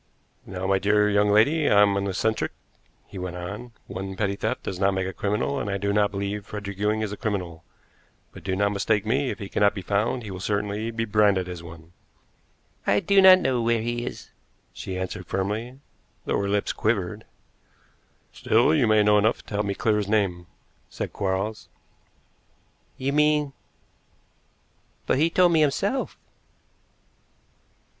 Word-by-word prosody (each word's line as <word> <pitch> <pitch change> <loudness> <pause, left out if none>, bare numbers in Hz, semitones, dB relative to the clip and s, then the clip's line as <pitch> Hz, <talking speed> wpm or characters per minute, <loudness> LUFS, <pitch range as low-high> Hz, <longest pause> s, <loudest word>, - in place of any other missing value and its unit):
"Now, 95 0 -5
my 95 0 +2
dear 105 +1 +3
young 105 0 +3
lady, 145 +10 +4
I'm 100 -1 +5
an 100 0 -1
eccentric," 110 +4 -1 0.5
he 95 - -9
went 90 -1 -5
on. 100 +7 -7
"One 95 0 -6
petty 100 -1 -1
theft 110 +5 -3
does 90 - -5
not 95 0 +2
make 95 0 -1
a 95 - -4
criminal, 105 +9 -1
and 105 - -3
I 100 - -1
do 100 +1 -1
not 105 0 +3
believe 100 +1 -4
Frederick 100 -2 -7
Ewing 105 +1 +1
is 110 -2 -2
a 105 - -6
criminal. 90 -7 -4 0.7
But - - -13
do 95 -1 -1
not 100 +1 +1
mistake 105 +1 0
me; 130 +4 +1
if - - -4
he 100 - -7
cannot 100 +1 +2
be 95 - -5
found 110 +6 0
he 105 - -7
will 95 - -6
certainly 105 +2 -2
be 115 0 -2
branded 100 -3 +2
as 90 -2 -7
one." 85 0 -13 0.9
"I 100 - +4
do 200 - +4
not 185 -1 +8
know 125 -6 +1
where 115 -1 +1
he 120 0 -2
is," - - -7 0.4
she 95 - -6
answered 95 -1 -5
firmly, 110 +7 -3 0.5
though - - 0
her 100 - -2
lips 100 +1 0
quivered. 105 -1 -1 1.1
"Still, 120 +7 +3
you 140 -7 +3
may 110 -1 +4
know 105 0 +5
enough 110 +3 0
to - - -10
help 105 0 0
me 100 - -2
to - - -22
clear 110 -2 +2
his 105 -1 -2
name," 95 -5 0 0.4
said - - -5
Quarles. 100 +3 -2 1.3
"You 135 +1 -2
mean 150 -1 +2 1.5
but - - +1
he 160 +2 +3
told 180 +1 +4
me 160 -2 +4
himself." 195 - 0
105 Hz, 175 wpm, -25 LUFS, 95-115 Hz, 1.5 s, not